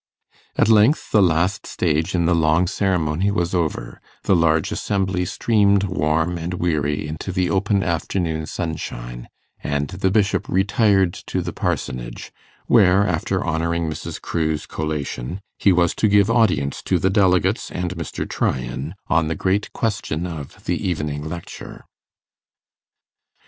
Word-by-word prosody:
At - - +3
length 110 +6 +4
the 105 - +5
last 90 +2 +1
stage 80 +4 0
in 85 -1 +2
the 85 - +3
long 80 +1 +3
ceremony 90 -2 0
was 90 -3 -1
over, 75 -9 -2 0.2
the 95 - +3
large 80 -2 +2
assembly 95 -2 -1
streamed 100 0 +2
warm 80 -1 0
and 85 +2 -3
weary 75 -4 -1
into 80 +5 -5
the 90 -1 0
open 100 0 +1
afternoon 80 -2 -2
sunshine, - - -5 0.3
and 70 0 -1
the 95 +1 0
Bishop 100 -1 +1
retired 95 -1 +3
to - - -1
the - - -5
Parsonage, - - -3 0.3
where, 95 +1 +5
after 85 -4 -1
honouring 85 +1 -1
Mrs. 80 - -5
Crewe's 80 -2 -2
collation, 75 +1 -4 0.2
he 100 - +4
was 85 -2 +3
to 110 - +1
give 100 +1 +4
audience 100 - +2
to 90 - +1
the 95 +3 +1
delegates 95 0 +2
and 90 0 -3
Mr. 85 -3 -5
Tryan 65 +6 -2
on 80 -3 +2
the 80 - -2
great 95 +5 0
question 100 -7 -2
of 80 -6 -8
the - - -1
evening 75 -4 -2
lecture. 85 0 -8
85 Hz, 140 wpm, -21 LUFS, 80-95 Hz, 0.3 s, the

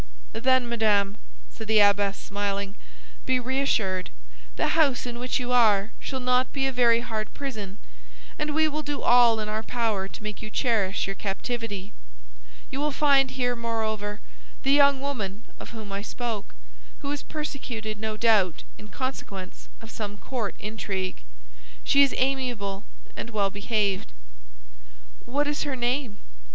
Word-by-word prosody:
"Then, 255 +1 +3
madame," 210 -4 +2 0.4
said 220 - -8
the 220 0 +5
abbess, 200 -1 +4
smiling, 200 0 -2 0.5
"be 260 -1 +3
reassured; 245 -8 0 0.5
the - - +1
house 295 -7 +3
in 240 -1 -5
which 250 +2 0
you 250 0 -3
are 215 -4 +4
shall 265 - -4
not 250 0 +2
be 270 -1 0
a 270 - +1
very 235 -2 +4
hard 220 -2 -3
prison, 215 -9 -5 0.6
and 300 0 -1
we 315 0 +4
will 305 0 -2
do 290 -1 -3
all 240 -2 +6
in 215 - -2
our 215 +1 -1
power 220 -4 -1
to 205 - -10
make 210 -1 -5
you 215 - -6
cherish 215 -5 +1
your 195 - -2
captivity. 205 0 -4 0.8
You 270 - -3
will 300 +1 +1
find 280 -2 +4
here, 245 -2 0
moreover, 220 -3 -2 0.4
the 270 - +3
young 280 -1 +6
woman 220 -7 -3 0.2
of - - -8
whom 220 -3 -8
I 200 0 -2
spoke, 225 - -4 0.5
who 280 - -2
is 290 - -2
persecuted, 240 -8 -5
no 215 0 -3
doubt, 210 -7 +3 0.2
in 210 - -10
consequence 205 -7 -5
of 225 - -10
some 205 -2 -5
court 230 -2 -3
intrigue. 195 -3 -3 0.6
She 280 - +5
is 275 - +5
amiable 245 -7 0 0.3
and - - -5
well 205 -3 +1
behaved." 200 - 0 1.1
"What 285 +4 +1
is 295 0 -1
her 285 -3 -1
name?" 245 -2 -1
230 Hz, 155 wpm, -27 LUFS, 205-260 Hz, 1.1 s, all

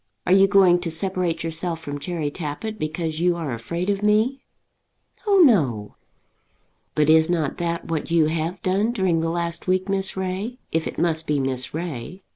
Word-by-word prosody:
Are 180 - +3
you 195 0 +6
going 190 -3 +5
to 175 -1 -3
separate 170 0 -1
yourself 165 +1 -3
from 145 -3 -6
Cherry 160 -2 -3
Tappitt 175 +8 -5
because 155 +1 -3
you 175 0 +2
are 160 -7 -3
afraid 170 +11 -4
of 200 -1 0
me?" 215 +6 +2 0.9
"Oh, 395 -2 +5
no." 130 - +2 1.0
"But 150 -1 +3
is 160 +1 +5
not 165 -5 0
that 170 -1 -2
what 165 -2 -3
you 165 -2 +4
have 165 +3 -2
done 200 +5 +1
during 185 -6 +1
the 165 0 -1
last 170 +1 -3
week, 185 +1 +1
Miss 195 -1 -1
Ray; 190 +6 -3
if 160 0 0
it - - -7
must 160 -1 0
be 150 -1 +1
Miss 130 0 -1
Ray?" 170 +2 -6
170 Hz, 180 wpm, -23 LUFS, 160-190 Hz, 1.0 s, you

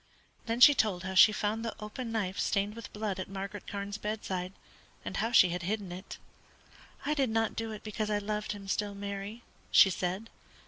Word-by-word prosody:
Then 230 +1 -1
she 290 +4 +10
told 200 -9 +1
how 190 0 -4
she 190 +3 +8
found 210 +1 -1
the 230 - -3
open 225 +3 -6
knife 200 -4 -2
stained 200 0 +1
with 230 -2 -9
blood 210 -3 -3
at 185 - -5
Margaret 195 +1 -6
Carne's 200 +1 -4
bedside, 190 -4 -3 0.5
and - - -4
how 225 +2 0
she 185 -7 +7
had 175 +1 -3
hidden 195 0 -3
it. 185 +2 -8 0.9
"I 300 - +2
did 275 -4 +1
not 225 0 0
do 225 -1 -3
it 215 - -8
because 215 0 -3
I 210 - +2
loved 210 +1 -2
him 200 -1 -9
still, 205 +1 -1
Mary," 200 +3 -6 0.3
she 195 - +7
said. 185 +5 -3
210 Hz, 195 wpm, -31 LUFS, 195-220 Hz, 0.9 s, she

